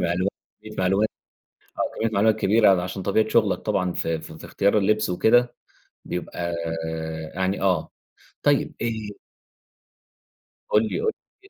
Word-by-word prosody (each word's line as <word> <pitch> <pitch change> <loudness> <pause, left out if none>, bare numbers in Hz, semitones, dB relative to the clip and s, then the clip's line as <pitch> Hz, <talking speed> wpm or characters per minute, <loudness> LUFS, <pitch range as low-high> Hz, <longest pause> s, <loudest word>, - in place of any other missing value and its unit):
معلومات 90 +2 +1 0.3
كمّية 110 0 -10
معلومات 95 +3 +2 0.7
آه. - - +1
كميّة 115 - +1
معلومات 110 +2 +4
كبيرة 110 +1 +5
ع - - -4
عشان 95 +1 -5
طبيعة 110 +2 +2
شغلك 110 -3 +3
طبعًا 90 +1 0
في 80 -1 -2
في 80 0 -10
في - - -11
اختيار 100 +2 +2
اللبس 105 +1 +2
وكده 120 +7 +3 0.5
بيبقى 85 -1 -4 0.8
يعني 95 +1 -1
آه. 90 -5 +1 0.5
طيب، - - +2
آآ 110 -3 -4 1.5
قُل 105 - +4
لي، - - -2
قُل 445 - +2 0.3
لي 395 - -18
100 Hz, 140 wpm, -24 LUFS, 90-110 Hz, 1.5 s, كبيرة